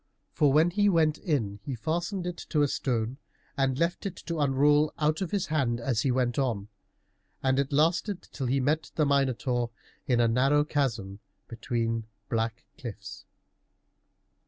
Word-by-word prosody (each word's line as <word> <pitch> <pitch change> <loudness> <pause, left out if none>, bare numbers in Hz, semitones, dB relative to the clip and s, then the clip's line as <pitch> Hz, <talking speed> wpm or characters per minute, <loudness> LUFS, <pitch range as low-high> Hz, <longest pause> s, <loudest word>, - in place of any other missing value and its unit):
For 145 -2 +3
when 155 +5 +4
he 205 +2 +3
went 160 -4 +2
in 110 - -1
he 130 +5 -4
fastened 175 - -2
it 175 -1 -4
to 150 -2 +3
a - - +3
stone 125 -2 -1 0.4
and 135 -2 +1
left 170 +5 0
it 185 - -6
to 170 -2 -3
unroll 145 +2 +3
out 155 +2 +1
of 185 - -1
his 200 -3 0
hand 135 -7 0
as 120 -2 0
he 135 - +1
went 125 0 +1
on, 110 -6 -1 0.7
and 130 0 +2
it 140 0 0
lasted 170 +6 +1
till 135 -3 -3
he 135 +3 +2
met 150 +5 0
the 155 - +3
Minotaur 130 -3 +1 0.4
in 125 -2 +2
a 120 - +4
narrow 135 +6 +3
chasm 115 -10 -2 0.3
between 115 -1 -2 0.2
black 115 0 -1 0.2
cliffs. 115 -5 -8
135 Hz, 160 wpm, -28 LUFS, 120-155 Hz, 0.7 s, when